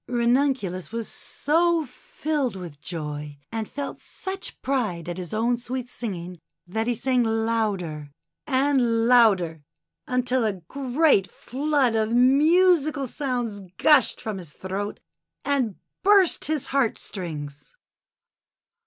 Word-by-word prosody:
Ranun 250 Hz, +3 st, +3 dB
culus 185 Hz, -6 st, -6 dB
was 230 Hz, -1 st, -3 dB
so 330 Hz, +2 st, +1 dB
filled 275 Hz, -1 st, -3 dB
with 170 Hz, -6 st, -9 dB
joy, 150 Hz, -3 st, -5 dB
and 225 Hz, -2 st, -3 dB
felt 285 Hz, -1 st, -5 dB
such 385 Hz, +1 st, -6 dB
pride 215 Hz, -, -1 dB
at 175 Hz, +1 st, -4 dB
his 180 Hz, -2 st, -6 dB
own 235 Hz, +3 st, +1 dB
sweet 245 Hz, +1 st, -5 dB
singing, 180 Hz, -6 st, -5 dB, 0.3 s
that 220 Hz, +6 st, -2 dB
he 245 Hz, -, +1 dB
sang 255 Hz, +2 st, +1 dB
louder 215 Hz, -9 st, -1 dB, 0.4 s
and 260 Hz, -5 st, +2 dB
louder, 195 Hz, -10 st, +4 dB, 0.5 s
until 250 Hz, 0 st, +1 dB
a 215 Hz, -2 st, +1 dB
great 250 Hz, -, +1 dB
flood 275 Hz, +1 st, 0 dB
of 220 Hz, +1 st, +1 dB
musical 300 Hz, +3 st, +4 dB
sounds 245 Hz, -6 st, -3 dB, 0.2 s
gushed 295 Hz, -6 st, +5 dB
from 215 Hz, -3 st, -4 dB
his 170 Hz, -5 st, -10 dB
throat 195 Hz, +5 st, -5 dB, 0.5 s
and 265 Hz, -8 st, 0 dB, 0.3 s
burst 395 Hz, -3 st, +4 dB
his 300 Hz, -2 st, -1 dB
heart 270 Hz, -5 st, +2 dB
strings. 150 Hz, -, -7 dB
235 Hz, 120 wpm, -25 LUFS, 190-275 Hz, 0.5 s, gushed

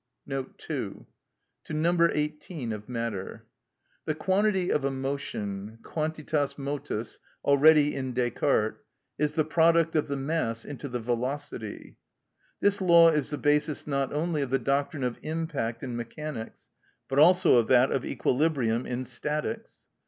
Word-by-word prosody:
(2) 135 Hz, -1 st, -5 dB, 0.6 s
To -, -, -6 dB
No. 170 Hz, +2 st, +3 dB
18 150 Hz, -4 st, -3 dB
of 105 Hz, +2 st, -8 dB
Matter. 115 Hz, -5 st, -4 dB, 0.6 s
The 155 Hz, -, -1 dB
quantity 190 Hz, +1 st, +1 dB
of 145 Hz, -, +1 dB
a 140 Hz, -, +1 dB
motion 115 Hz, -7 st, -4 dB
(quantitas 155 Hz, -2 st, -2 dB
motus, 140 Hz, -5 st, -4 dB, 0.3 s
already 145 Hz, +1 st, +6 dB
in 130 Hz, -1 st, -3 dB
Descartes) 120 Hz, -2 st, 0 dB, 0.4 s
is 150 Hz, 0 st, +1 dB
the 155 Hz, -2 st, +1 dB
product 165 Hz, +1 st, +3 dB
of 155 Hz, -, +2 dB
the 140 Hz, -1 st, -2 dB
mass 135 Hz, -5 st, -2 dB
into 140 Hz, 0 st, -6 dB
the 125 Hz, 0 st, -3 dB
velocity. 120 Hz, -1 st, -4 dB, 0.6 s
This 205 Hz, 0 st, +2 dB
law 170 Hz, -2 st, +7 dB
is 150 Hz, -3 st, 0 dB
the 150 Hz, -, -3 dB
basis 150 Hz, 0 st, +1 dB
not 140 Hz, -2 st, -1 dB
only 155 Hz, +1 st, -1 dB
of 135 Hz, -, -2 dB
the 135 Hz, -, +2 dB
doctrine 140 Hz, +2 st, -1 dB
of 125 Hz, -2 st, -2 dB
impact 155 Hz, -8 st, -3 dB
in 125 Hz, -3 st, -4 dB
mechanics, 120 Hz, +1 st, -6 dB, 0.4 s
but 135 Hz, +1 st, +1 dB
also 180 Hz, -1 st, +6 dB
of 115 Hz, -, +3 dB
that 130 Hz, +1 st, +5 dB
of 135 Hz, -, 0 dB
equilibrium 125 Hz, -3 st, 0 dB
in 125 Hz, +1 st, -3 dB
statics. 155 Hz, -, -4 dB
140 Hz, 140 wpm, -28 LUFS, 125-155 Hz, 0.6 s, law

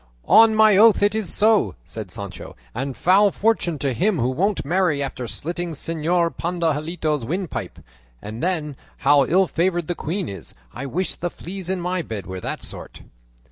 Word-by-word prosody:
"On 225 Hz, -1 st, +6 dB
my 215 Hz, -2 st, +6 dB
oath 215 Hz, -1 st, +6 dB
it 205 Hz, 0 st, +3 dB
is 220 Hz, -4 st, -2 dB
so," 205 Hz, -, +3 dB
said -, -, -8 dB
Sancho; -, -, -8 dB, 0.2 s
"and 130 Hz, +1 st, -4 dB
foul 195 Hz, -, +5 dB
fortune 195 Hz, -6 st, 0 dB
to 140 Hz, -2 st, -1 dB
him 190 Hz, -, +1 dB
who 125 Hz, -1 st, +1 dB
won't 190 Hz, +9 st, 0 dB
marry 165 Hz, -3 st, +1 dB
after 130 Hz, -3 st, -5 dB
slitting 170 Hz, +6 st, -4 dB
Señor 165 Hz, +3 st, 0 dB
Pandahilado's 160 Hz, -3 st, -1 dB
windpipe! 175 Hz, +5 st, -4 dB, 0.4 s
And 110 Hz, -, -7 dB
then, 160 Hz, -6 st, -2 dB, 0.3 s
how 145 Hz, -2 st, +6 dB
ill 190 Hz, +3 st, +4 dB
favoured 175 Hz, 0 st, 0 dB
the 175 Hz, -, -1 dB
queen 175 Hz, +3 st, -3 dB
is! 95 Hz, -4 st, -8 dB, 0.2 s
I 140 Hz, -, -5 dB
wish 180 Hz, +7 st, -1 dB
the 175 Hz, -, -3 dB
fleas 185 Hz, +1 st, -7 dB
in 190 Hz, -1 st, -1 dB
my 180 Hz, +1 st, -1 dB
bed 110 Hz, -, -6 dB
were 95 Hz, -1 st, -6 dB
that -, -, -4 dB
sort!" -, -, -7 dB
170 Hz, 175 wpm, -22 LUFS, 145-190 Hz, 0.4 s, On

